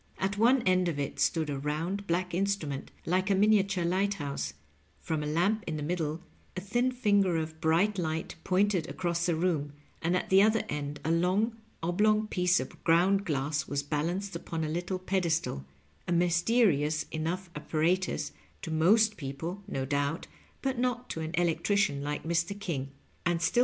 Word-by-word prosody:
At 195 Hz, +1 st, -1 dB
one 240 Hz, +4 st, +4 dB
end 185 Hz, -1 st, +3 dB
of 165 Hz, -4 st, -1 dB
it 140 Hz, -1 st, -3 dB
stood 160 Hz, -2 st, +2 dB
a 140 Hz, -, -3 dB
round, 165 Hz, +8 st, -2 dB
black 180 Hz, +1 st, -1 dB
instrument 175 Hz, -7 st, -1 dB, 0.2 s
like 185 Hz, +3 st, +1 dB
a 195 Hz, -, +4 dB
miniature 195 Hz, -3 st, +3 dB
light 195 Hz, +3 st, +1 dB
house; 140 Hz, -, -4 dB, 0.4 s
from 160 Hz, -2 st, -2 dB
a 150 Hz, -, -3 dB
lamp 185 Hz, +8 st, +1 dB
in 160 Hz, -2 st, -2 dB
the 150 Hz, -, -4 dB
middle 160 Hz, 0 st, -2 dB, 0.3 s
a -, -, 0 dB
thin 240 Hz, +7 st, 0 dB
finger 205 Hz, -7 st, +2 dB
of 160 Hz, 0 st, -4 dB
bright 180 Hz, +6 st, +2 dB
light 160 Hz, -1 st, -2 dB
pointed 190 Hz, -2 st, +1 dB
across 170 Hz, -1 st, -1 dB
the 170 Hz, -, +2 dB
room, 160 Hz, -4 st, 0 dB, 0.3 s
and 175 Hz, +2 st, +2 dB
at -, -, -4 dB
the 190 Hz, +1 st, +7 dB
other 220 Hz, +1 st, +3 dB
end 145 Hz, 0 st, -4 dB
a 160 Hz, -, +1 dB
long, 185 Hz, +7 st, +2 dB, 0.3 s
oblong 210 Hz, +5 st, +2 dB
piece 180 Hz, -3 st, +2 dB
of -, -, -7 dB
ground 185 Hz, +4 st, +3 dB
glass 145 Hz, -2 st, -1 dB
was 140 Hz, 0 st, -1 dB
balanced 170 Hz, +7 st, -2 dB
upon 165 Hz, -1 st, -4 dB
a 155 Hz, -, -2 dB
little 175 Hz, +3 st, -2 dB
pedestal 170 Hz, -, -1 dB, 0.2 s
— -, -, -36 dB
^a 175 Hz, -, +1 dB
mysterious 170 Hz, -, +3 dB
enough 170 Hz, +3 st, -3 dB
apparatus 165 Hz, +5 st, 0 dB, 0.3 s
to 165 Hz, -, -4 dB
most 210 Hz, +7 st, +4 dB
people, 160 Hz, +6 st, -5 dB
no 135 Hz, -9 st, -2 dB
doubt, 145 Hz, +4 st, -1 dB, 0.4 s
but 265 Hz, -2 st, -1 dB
not 250 Hz, 0 st, -1 dB
to -, -, -4 dB
an 160 Hz, 0 st, -3 dB
electrician 175 Hz, -2 st, +1 dB
like 150 Hz, 0 st, -3 dB
Mr. 170 Hz, +4 st, -1 dB
King, 145 Hz, -9 st, -3 dB, 0.3 s
and 175 Hz, -1 st, +1 dB
still. 170 Hz, +8 st, +1 dB
175 Hz, 175 wpm, -30 LUFS, 155-195 Hz, 0.4 s, the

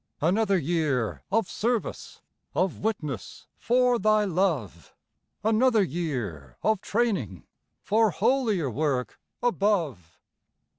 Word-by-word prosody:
Another 195 Hz, +5 st, +2 dB
year 150 Hz, -8 st, 0 dB
of 225 Hz, -1 st, +2 dB
service, 235 Hz, 0 st, -3 dB, 0.3 s
Of 185 Hz, 0 st, 0 dB
witness 150 Hz, -, -4 dB
for 245 Hz, 0 st, +3 dB
Thy 215 Hz, +1 st, +3 dB
love; 160 Hz, -, -1 dB, 0.5 s
Another 225 Hz, 0 st, +4 dB
year 120 Hz, -, -4 dB
of 215 Hz, -3 st, +2 dB
training 195 Hz, -, -1 dB, 0.4 s
For 220 Hz, +1 st, +3 dB
holier 220 Hz, -, +1 dB
work 135 Hz, 0 st, -1 dB, 0.2 s
above. 175 Hz, -, 0 dB
185 Hz, 95 wpm, -26 LUFS, 135-220 Hz, 0.5 s, Another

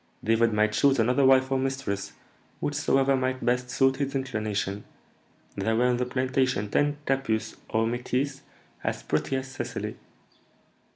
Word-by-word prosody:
David 115 Hz, +1 st, +3 dB
might 105 Hz, 0 st, +2 dB
choose 135 Hz, +5 st, +3 dB
another 125 Hz, +4 st, +3 dB
wife 130 Hz, 0 st, +4 dB
or 135 Hz, -, +2 dB
mistress, 130 Hz, -7 st, -3 dB, 0.5 s
whichsoever 135 Hz, -2 st, +2 dB
might 130 Hz, 0 st, -1 dB
best 125 Hz, 0 st, +1 dB
suit 135 Hz, +1 st, +2 dB
his 140 Hz, -1 st, -2 dB
inclination; 105 Hz, -6 st, -2 dB, 0.7 s
there 110 Hz, 0 st, 0 dB
were 120 Hz, +2 st, +3 dB
in 125 Hz, -1 st, +2 dB
the 125 Hz, 0 st, -1 dB
plantation 130 Hz, -5 st, 0 dB
ten 145 Hz, 0 st, +2 dB
capusses 115 Hz, -5 st, -1 dB
or 110 Hz, +1 st, +1 dB
métisses 125 Hz, +4 st, -2 dB, 0.4 s
as -, -, -2 dB
pretty 135 Hz, -, -1 dB
as 130 Hz, 0 st, -3 dB
Cecily. 130 Hz, -, -4 dB
130 Hz, 140 wpm, -27 LUFS, 115-135 Hz, 0.7 s, wife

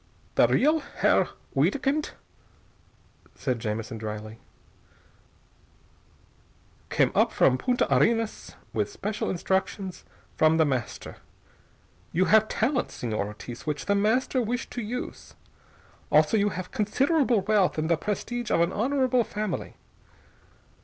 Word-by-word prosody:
"The -, -, +5 dB
real 305 Hz, +4 st, +3 dB
Herr 280 Hz, -, +1 dB, 0.3 s
Wiedkind," 285 Hz, +2 st, +1 dB, 1.2 s
said 125 Hz, -4 st, -2 dB
Jamison 110 Hz, 0 st, -4 dB
dryly, 110 Hz, 0 st, -6 dB, 2.5 s
"came -, -, +2 dB
up -, -, +3 dB
from 130 Hz, -, +4 dB
Punta 245 Hz, -, +1 dB
Arenas 225 Hz, -1 st, +1 dB, 0.2 s
with -, -, -1 dB
special 215 Hz, -, -3 dB
instructions 190 Hz, +1 st, -2 dB, 0.3 s
from 155 Hz, +1 st, +4 dB
The 160 Hz, -, +4 dB
Master. 130 Hz, -5 st, -3 dB, 0.9 s
You 185 Hz, +3 st, +2 dB
have 220 Hz, +1 st, +5 dB
talents, 245 Hz, +5 st, -1 dB
Señor 110 Hz, -3 st, -1 dB
Ortiz, 115 Hz, +6 st, -9 dB
which 150 Hz, -1 st, -2 dB
The 200 Hz, -, +2 dB
Master 225 Hz, +6 st, +2 dB
wished 240 Hz, +1 st, -3 dB
to 240 Hz, -, -4 dB
use. 240 Hz, +3 st, -6 dB, 0.8 s
Also -, -, +4 dB
you 205 Hz, -1 st, +3 dB
have 185 Hz, -2 st, -6 dB
considerable 255 Hz, +2 st, +2 dB
wealth 200 Hz, -3 st, +2 dB
and 155 Hz, 0 st, 0 dB
the 170 Hz, -, +3 dB
prestige 235 Hz, +7 st, -3 dB
of -, -, +2 dB
an 170 Hz, +2 st, +1 dB
honorable 255 Hz, +1 st, +2 dB
family. 210 Hz, -3 st, -4 dB
205 Hz, 120 wpm, -26 LUFS, 155-245 Hz, 2.5 s, The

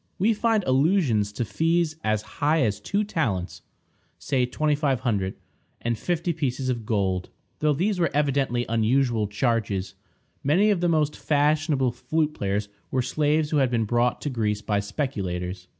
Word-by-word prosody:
We 215 Hz, +5 st, +3 dB
find 220 Hz, -1 st, +1 dB
allusions 130 Hz, -, +2 dB
to 120 Hz, -, -2 dB
fees 165 Hz, +4 st, +1 dB
as 110 Hz, -1 st, 0 dB, 0.2 s
high 150 Hz, +1 st, +3 dB
as 105 Hz, -3 st, 0 dB
two 200 Hz, -, -1 dB
talents 115 Hz, -, -2 dB, 0.6 s
(say 130 Hz, -3 st, 0 dB
$2500) 130 Hz, -9 st, 0 dB, 0.4 s
and 120 Hz, 0 st, -1 dB
fifty 170 Hz, +7 st, -1 dB
pieces 135 Hz, -4 st, -2 dB
of 115 Hz, -4 st, -3 dB
gold, 95 Hz, -4 st, 0 dB, 0.3 s
though 150 Hz, -1 st, +2 dB
these 185 Hz, +6 st, 0 dB
were 170 Hz, -3 st, +2 dB
evidently 140 Hz, -4 st, +1 dB
unusual 115 Hz, 0 st, +1 dB
charges. 105 Hz, -3 st, -1 dB, 0.5 s
Many 180 Hz, +10 st, +4 dB
of 190 Hz, -4 st, 0 dB
the 175 Hz, -, +2 dB
most 155 Hz, -2 st, +1 dB
fashionable 150 Hz, -3 st, +1 dB
flute 155 Hz, +4 st, -1 dB
players 100 Hz, -2 st, -2 dB, 0.2 s
were 130 Hz, -1 st, 0 dB
slaves 150 Hz, +3 st, +1 dB
who 155 Hz, -, +2 dB
had 135 Hz, -3 st, +3 dB
been 115 Hz, -2 st, 0 dB
brought 120 Hz, +2 st, +1 dB
to 145 Hz, -, -3 dB
Greece 105 Hz, -3 st, -1 dB
by 105 Hz, -1 st, 0 dB
speculators. 95 Hz, -6 st, -3 dB
130 Hz, 150 wpm, -25 LUFS, 110-155 Hz, 0.6 s, Many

